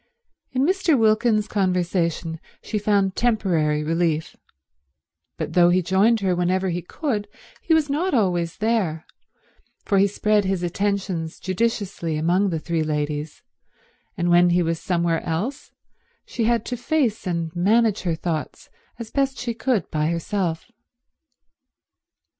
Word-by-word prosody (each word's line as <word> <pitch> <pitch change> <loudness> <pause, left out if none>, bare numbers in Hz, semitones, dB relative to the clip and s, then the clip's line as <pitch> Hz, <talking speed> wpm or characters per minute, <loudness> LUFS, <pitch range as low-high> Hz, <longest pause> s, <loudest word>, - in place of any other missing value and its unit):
In 260 +1 +1
Mr. 360 -4 +2
Wilkins's 215 -1 +3
conversation 175 -4 -1 0.2
she 215 - -2
found 200 -2 +1
temporary 170 -10 +1
relief, 165 0 -1 1.0
but 155 0 -4
though 175 0 +5
he 180 +1 +2
joined 200 +5 +3
her 185 -2 +1
whenever 185 +2 0
he 175 0 -2
could 215 - -3 0.3
he 325 - +2
was 315 -2 +2
not 320 +7 0
always 175 -6 0
there, 210 -8 0 0.8
for 200 -2 +2
he 200 - +5
spread 210 +1 +1
his 190 -2 -1
attentions 185 -2 -2
judiciously 190 -5 -2
among 180 +6 +2
the 165 - -1
three 165 +1 -2
ladies, 150 0 -3 0.7
and 175 0 +1
when 175 +1 +6
he 175 0 +3
was 165 0 -1
somewhere 170 -2 0
else 200 - -4 0.5
she 230 - -2
had 230 -1 +1
to 250 - -3
face 245 - 0
and 170 -1 -2
manage 215 +4 +2
her 170 -3 -1
thoughts 160 -4 -5 0.3
as 225 -2 -8
best 275 -1 0
she 240 -1 -3
could 240 -2 0
by 155 -1 0
herself. 170 +3 -2
185 Hz, 135 wpm, -23 LUFS, 170-220 Hz, 1.0 s, when